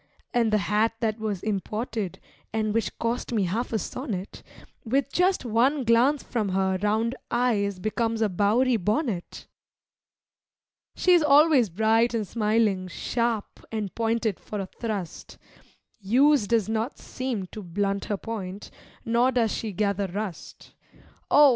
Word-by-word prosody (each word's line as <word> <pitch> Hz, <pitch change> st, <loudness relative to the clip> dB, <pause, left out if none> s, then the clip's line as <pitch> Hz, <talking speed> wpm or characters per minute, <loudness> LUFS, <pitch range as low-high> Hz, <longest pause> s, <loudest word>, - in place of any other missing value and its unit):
And 230 Hz, -2 st, +2 dB
the 215 Hz, -, +4 dB
hat 210 Hz, +4 st, +1 dB
that 220 Hz, -1 st, 0 dB
was 210 Hz, -4 st, -3 dB
imported 215 Hz, -1 st, -3 dB, 0.3 s
(and 215 Hz, -1 st, -1 dB
which 220 Hz, -5 st, -1 dB
cost 235 Hz, +2 st, -2 dB
me 215 Hz, -4 st, +2 dB
half 210 Hz, +7 st, -2 dB
a 225 Hz, -, +1 dB
sonnet), 210 Hz, -4 st, -5 dB, 0.4 s
With 270 Hz, +4 st, 0 dB
just 365 Hz, -5 st, +2 dB
one 255 Hz, +5 st, +2 dB
glance 245 Hz, +5 st, +3 dB
from 220 Hz, -5 st, -2 dB
her 190 Hz, 0 st, +1 dB
round 220 Hz, +3 st, +1 dB, 0.2 s
eyes 215 Hz, -5 st, +1 dB
becomes 225 Hz, +3 st, -1 dB
a -, -, +3 dB
Bowery 220 Hz, +6 st, +2 dB
bonnet. 210 Hz, -, -2 dB, 1.5 s
She 365 Hz, -, +2 dB
is 350 Hz, -, +6 dB
always 295 Hz, -5 st, +5 dB
bright 225 Hz, +5 st, +2 dB
and 220 Hz, -2 st, -1 dB
smiling, 210 Hz, -4 st, +1 dB
sharp 230 Hz, +3 st, -2 dB
and 215 Hz, -4 st, -3 dB
pointed 225 Hz, -3 st, 0 dB
for 210 Hz, -, -6 dB
a 195 Hz, -, -2 dB
thrust. 200 Hz, -3 st, -6 dB, 0.6 s
Use 255 Hz, +4 st, +3 dB
does 225 Hz, -2 st, +2 dB
not 220 Hz, +4 st, -2 dB
seem 255 Hz, -7 st, -4 dB
to 215 Hz, -, -7 dB
blunt 200 Hz, +2 st, -2 dB
her 205 Hz, -, -2 dB
point, 200 Hz, -3 st, -6 dB, 0.3 s
nor 235 Hz, +3 st, +3 dB
does 235 Hz, -4 st, +1 dB
she 220 Hz, -, -3 dB
gather 200 Hz, 0 st, 0 dB
rust, 195 Hz, 0 st, -7 dB, 0.6 s
Oh! 290 Hz, -1 st, +7 dB
220 Hz, 140 wpm, -26 LUFS, 200-235 Hz, 1.5 s, Oh